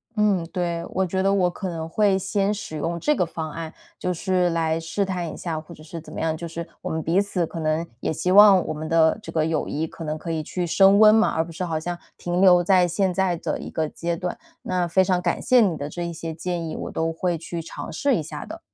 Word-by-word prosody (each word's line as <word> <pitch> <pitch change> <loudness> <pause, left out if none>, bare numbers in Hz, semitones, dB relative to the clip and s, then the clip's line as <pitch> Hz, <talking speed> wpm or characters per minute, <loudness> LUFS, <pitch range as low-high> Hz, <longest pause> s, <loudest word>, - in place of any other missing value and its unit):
嗯， 205 -5 +2
对， 170 -2 -2
我 190 +1 0
觉 190 +1 -1
得 195 - +3
我 180 -3 +3
可 185 +2 -5
能 165 -2 -4
会 200 +2 +2
先 195 +1 0
使 195 -6 -6
用 170 +3 -2
这 300 - +2
个 180 - +1
方 160 -2 -5
案， 160 0 -6 0.2
就 180 - -2
是 180 0 +1
来 165 -1 0
试 165 +5 -2
探 180 -3 -3
一 - - -9
下， 160 -3 -3
或 170 +2 -13
者 155 - -14
是 165 +1 -8
怎 - - -13
么 - - -5
样， 160 -1 0
就 170 +2 -6
是 165 +1 -6
我 - - -4
们 160 - -2
彼 170 +5 +2
此 185 -4 -1
可 165 - -7
能 155 +2 0 0.2
也 - - -1
希 160 +4 -1
望 200 -3 +8
我 - - -2
们 155 +1 -6
的 165 +1 +4
这 - - -8
个 155 -1 +1
友 160 -2 -1
谊 155 +3 -2
可 165 - -9
能 155 0 -3
可 165 +1 -5
以 160 -1 -1
去 180 +3 -3
升 195 +4 +5
温 215 0 +8
嘛， 225 +1 +4
而 160 0 0
不 170 - -10
是 170 - -4
好 165 -3 -1
像 175 +2 -4 0.2
停 175 +1 -1
留 180 -2 +7
在 180 0 +4
现 185 +2 0
在 185 -1 +1
的 - - -3
一 - - -7
个 155 -1 -1
阶 170 +2 -3
段。 180 +1 -4 0.3
那 180 -1 0
非 190 +3 +3
常 180 -1 +1
感 - - -1
谢 255 -2 +5
你 185 -7 +2
的 145 - -4
这 175 +3 -5
一 170 - -3
些 165 0 -5
建 170 0 -3
议， 155 - -5
我 - - -5
都 165 0 -1
会 175 0 -1
去 165 +1 -5
尝 160 - -8
试 280 -2 +1
一 160 - -1
下 - - -7
的。 - - -9
170 Hz, 290 characters per minute, -24 LUFS, 160-190 Hz, 0.3 s, 望